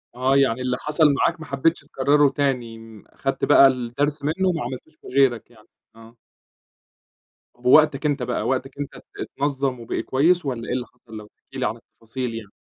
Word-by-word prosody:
آه، 130 +2 +1
يعني 130 -3 +2
اللي 125 0 -1
حصل 150 +2 0
معاك 165 +4 0
ما 155 - -8
حبيتش 160 +5 0
تكرره 145 +1 +2
تاني، 115 -6 -3
أخدت - - -3
بقى 135 - +7
الدرس 135 +4 -2
منه 175 +6 0
وما 165 -6 -1
عملتهوش 130 +5 -8
في - - -14
غيرك 125 -3 +1
يعني، 110 -2 -21 0.3
آه. 115 +1 -16 1.4
طب 120 +1 -23
ووقتك 150 +2 +5
أنت 145 -3 0
بقى، - - -2
وقتك 135 +1 -2
أنت 145 - -5
ات - - -14 0.2
اتنظم 135 -3 -2
وبقى 115 - -3
كويس 165 +5 +2
والّا 120 -4 -4
إيه - - -2
اللي 125 -1 -3
حصل، 110 -3 -14
لو 105 - -10
تحكي 135 +5 -15
لي 130 - -1
عن 110 - -1
التفاصيل 115 +2 -7
يعني؟ 110 -3 -8
130 Hz, 185 wpm, -23 LUFS, 120-145 Hz, 1.4 s, بقى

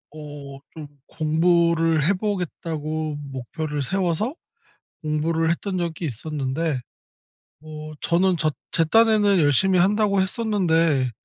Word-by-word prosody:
어 145 -2 -9 0.2
좀 155 -2 -8 0.2
'공부를 165 0 +2
해 190 - +3
보겠다.'고 160 -6 -3
목표를 145 +3 -4
세워서 190 - -1 0.7
공부를 160 +1 0
했던 185 +3 -2
적이 170 -1 -3
있었는데 145 +2 -2 0.8
뭐 155 0 -9
저는 180 +1 +2
저 155 -1 +1 0.2
제 165 - +2
딴에는 215 0 +4
열심히 175 +5 +3
한다고 200 +1 +3
했었는데 170 - +1
165 Hz, 240 characters per minute, -23 LUFS, 150-185 Hz, 0.8 s, 딴에는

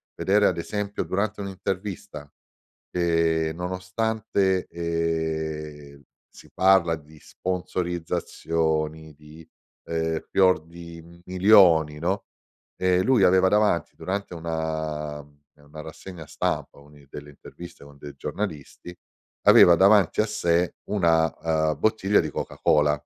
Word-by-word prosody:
vedere 105 +2 +2
ad - - -1
esempio 105 +4 -3
durante 100 +2 -2
un'intervista, 95 -5 -6 0.6
ehm, 80 -2 0
nonostante, 95 +2 -1
ehm, 80 -3 -4 0.3
si - - -17
parla 95 -3 +3
di 75 +1 -18
sponsorizzazioni, 80 -3 -3
di, 75 +2 -15 0.4
ehm, 80 -1 -2
fior 95 -3 +3
di 85 0 -13
milioni, 90 -6 +4
no, 95 +5 -2 0.5
ehm, 90 0 +2
lui 125 -3 +3
aveva 95 0 +5
davanti 105 -4 +1
durante 100 0 -4
una 80 -2 -4
ehm, 70 0 -17 0.2
una 75 +1 -14
rassegna 80 +1 -10
stampa, - - -3
a - - -17
una 75 -1 -19
delle 75 0 -10
interviste 85 +4 -13
con 70 0 -16
dei 70 0 -10
giornalisti, 90 -1 -6 0.5
aveva 85 - +8
davanti 100 0 +4
a - - +1
sé 85 -4 0
una, 80 -4 +1
uhm, 75 - -6
bottiglia 105 0 +2
di 80 - -4
Coca-Cola. 75 -1 +1
85 Hz, 115 wpm, -24 LUFS, 80-95 Hz, 0.6 s, aveva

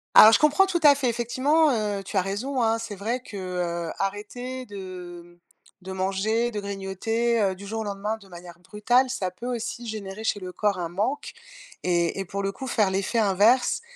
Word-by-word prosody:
Alors 220 - +11
je - - +5
comprends 300 +6 +5
tout 370 -3 0
à 290 -2 +8
fait 275 -2 -1
effectivement, 260 +7 +2
heu, 210 -4 -1
tu 195 - -4
as - - +5
raison, 240 +7 -2
hein, 225 0 +2
c'est 225 -2 -6
vrai 225 +6 -2
que, 225 -5 -10
heu, 175 -3 -3
arrêter 245 +6 -4
de, 185 -4 -8
hem, 175 0 -20 0.4
de 190 - -7
manger, 195 +5 0
de 215 - -4
grignoter, 200 +4 -1
heu, 195 -2 +2
du 200 +2 -10
jour 220 +2 -3
au - - -2
lendemain 205 +1 -3
de 200 -3 -17
manière 175 -1 -11
brutale, 225 +8 +1
ça 190 -8 -2
peut 185 +6 -11
aussi 235 +1 -5
générer 215 -2 -6
chez 215 - 0
le 185 -1 -7
corps 200 0 0
un 170 -1 -3
manque. 210 - -2 0.5
Et 175 0 +1
et 195 - -2
pour 200 +2 -4
le 195 0 -1
coup 230 +7 -8
faire 215 -6 +2
l'effet 195 +5 0
inverse 215 - +3
205 Hz, 205 wpm, -25 LUFS, 190-235 Hz, 0.5 s, Alors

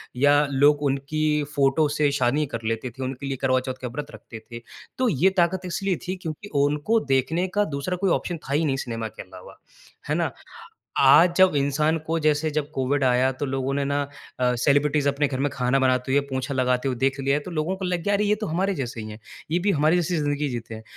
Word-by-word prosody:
या 145 +3 +4
लोग 145 +2 +4
उनकी 150 +2 0
फ़ोटो 140 +2 +3
से 145 -1 +3
शादी 140 +2 +1
कर - - -3
लेते 115 +3 -2
थे। 130 +3 -8
उनके 130 +1 -5
लिए 135 -1 -3
करवाचौथ 130 0 +1
का 125 - -3
व्रत 145 +5 -6
रखते 115 - -11
थे। 115 0 -7 0.4
तो 255 -2 +2
ये 180 +3 +3
ताक़त 175 +2 +2
इसलिए 190 +1 -1
थी 185 - -2
क्योंकि 160 +5 -6
उनको 150 +10 +2
देखने 160 +8 +1
का 205 - +3
दूसरा 140 +3 -3
कोई 195 0 0
ऑप्शन 175 -2 -1
था 140 -2 -6
ही 160 +2 +2
नहीं 135 -3 +1
सिनेमा 115 -4 -4
के - - -10
अलावा। 95 -1 -13 0.5
है - - +1
ना? - - 0 0.7
आज 175 +1 +6
जब 185 -5 +5
इंसान 150 +3 +1
को 165 +1 0
जैसे 155 0 +1
जब 150 -1 -2
कोविड 135 -1 0
आया 130 +1 +3
तो 130 - -4
लोगों 135 0 -2
ने 140 0 0
ना 145 +1 0 0.4
अ, 125 -1 +2
सेलिब्रिटीज़ 145 +3 +2
अपने 140 +1 +1
घर 130 -2 -4
में 145 +1 +1
खाना 125 +1 +1
बनाते 130 0 +1
हुए 140 - +4
पोछा 130 +2 -2
लगाते 125 0 +1
हुए 125 - -3
देख 135 +2 0
लिया 140 +1 +1
तो 185 - -6
लोगों 165 +3 -1
को 190 - -4
लग 180 -2 -2
गया 205 - +1
अरे 200 +1 +2
ये 210 +1 +3
तो 210 - -2
हमारे 190 +4 0
जैसे 120 -5 -4
ही 110 - -7
हैं। 105 - -9 0.3
ये 175 - +2
भी 200 +3 +1
हमारे 155 0 +3
जैसी 175 0 0
ज़िंदगी 145 -1 -1
जीते 115 -2 -6
हैं। 110 - -10
145 Hz, 230 wpm, -24 LUFS, 130-160 Hz, 0.7 s, आज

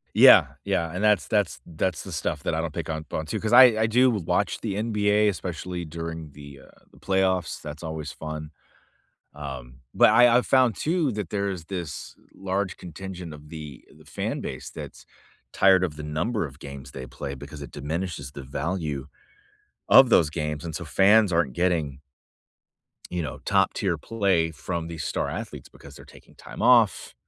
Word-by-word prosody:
Yeah, - - +8 0.2
yeah, 85 -1 -1
and 95 +4 -3
that's 105 -3 +3
that's 105 -5 0
that's 85 +1 -2
the - - -9
stuff - - -3
that - - -1
I 80 - 0
don't 80 -2 -4
pick 80 -1 -5
on 80 0 -3
pon 80 - -5
to, - - -3
‘cause 110 +1 -2
I 130 - +11 0.2
I - - +4
do 125 +4 +4
watch 105 -8 -1
the 95 - -3
NBA, 105 -1 +2
especially 90 -1 -5
during 80 -1 -6
the, 70 -1 -12
uh, - - -22
the - - -20
playoffs, 95 -2 0
that's 75 +2 -8
always 80 -2 -5
fun. 75 +2 -7 0.8
Um, 65 -4 -8
but - - +6
I 120 0 +7
I've 125 - +2
found 130 -6 +3
too 160 -4 0
that 105 -5 -5
there's 100 -4 -2
this 85 -6 -6 0.2
large 95 0 -2
contingent 90 0 -8
of 75 0 -14
the 75 -5 -9
the 80 - -18
fan 75 - -4
base 65 - -6
that's - - -10 0.5
tired 95 -1 +5
of 80 -5 -4
the 75 - -7
number 85 +8 -2
of 70 0 -13
games 70 -2 -9
they 65 -1 -8
play, 70 +2 -6
because 70 +2 -10
it 70 - -8
diminishes 75 -1 -4
the 70 - -8
value 75 0 -3 0.8
of 130 - +8
those 85 -9 +4
games, 75 0 -4
and 80 -2 -5
so 85 - -5
fans 100 +6 +4
aren't 85 -6 +1
getting 80 -5 0 1.1
you 90 - -2
know, 75 -5 -5
top - - +2
tier - - -1
play 95 -7 0
from 85 +1 -4
these 80 -3 -6
star - - -2
athletes - - -7
because - - -15
they're - - -13
taking - - -18
time - - -10
off. 115 -7 +4
85 Hz, 185 wpm, -25 LUFS, 75-95 Hz, 1.1 s, I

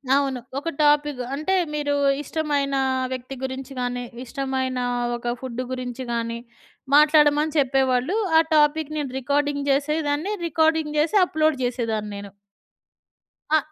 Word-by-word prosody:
అవును. 270 -3 0 0.2
ఒక 330 +4 -2
టాపిగు, 295 -3 +2
అంటే, 380 +6 0 0.2
మీరు 290 -1 0 0.3
ఇష్టమైన 285 -2 -1 0.4
వ్యక్తి 255 +1 -5
గురించి 265 +1 -5
గాని, 245 0 -2 0.2
ఇష్టమైన 260 -1 -2 0.4
ఒక 240 0 -3
ఫుడ్డు 255 -1 -4
గురించి 255 0 -4
గాని 230 0 -2 0.6
మాట్లాడమని 300 0 +5
చెప్పేవాళ్ళు. 265 - +2 0.2
ఆ - - +8 0.2
టాపిక్ 305 0 +2
నేను 285 -4 -3
రికార్డింగ్ 285 +2 0
చేసేదాన్ని. 300 +5 0
రికార్డింగ్ 320 -1 +1
చేసి 320 +8 +1
అప్‌లోడ్ 315 -3 +1
చేసేదాన్ని 230 -4 -2
నేను. 200 0 -8 1.2
అ! - - +7
280 Hz, 120 wpm, -23 LUFS, 255-300 Hz, 1.2 s, ఆ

